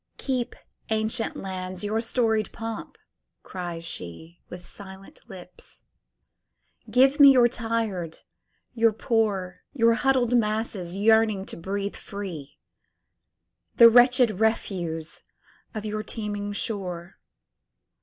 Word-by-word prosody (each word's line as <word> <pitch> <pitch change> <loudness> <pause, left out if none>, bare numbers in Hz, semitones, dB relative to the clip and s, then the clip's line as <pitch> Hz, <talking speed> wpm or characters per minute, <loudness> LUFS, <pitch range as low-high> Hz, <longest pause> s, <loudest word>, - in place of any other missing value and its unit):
"Keep, 255 -2 -2 0.3
ancient 220 +1 -1
lands, 185 -1 -6
your 215 +2 -1
storied 225 -2 0
pomp!" 225 -1 -7 0.5
cries 175 -3 -6
sheWith 165 - -9
silent 195 0 -12
lips. 180 -1 -14 1.1
"Give 270 +3 +4
me 280 -1 +9
your 245 -2 +6
tired, 225 -8 -3 0.5
your 230 -2 +3
poor, 205 -5 -1
Your 230 -4 +4
huddled 250 -1 +2
masses 215 -5 -1
yearning 215 -1 +3
to - - -8
breathe 200 +4 -4
free, 180 -9 -8 1.2
The 230 -1 +9
wretched 245 -3 +5
refuse 175 -7 -2 0.5
of 215 0 -4
your 215 0 -3
teeming 205 -2 -5
shore. 185 -4 -5
215 Hz, 100 wpm, -25 LUFS, 185-230 Hz, 1.2 s, me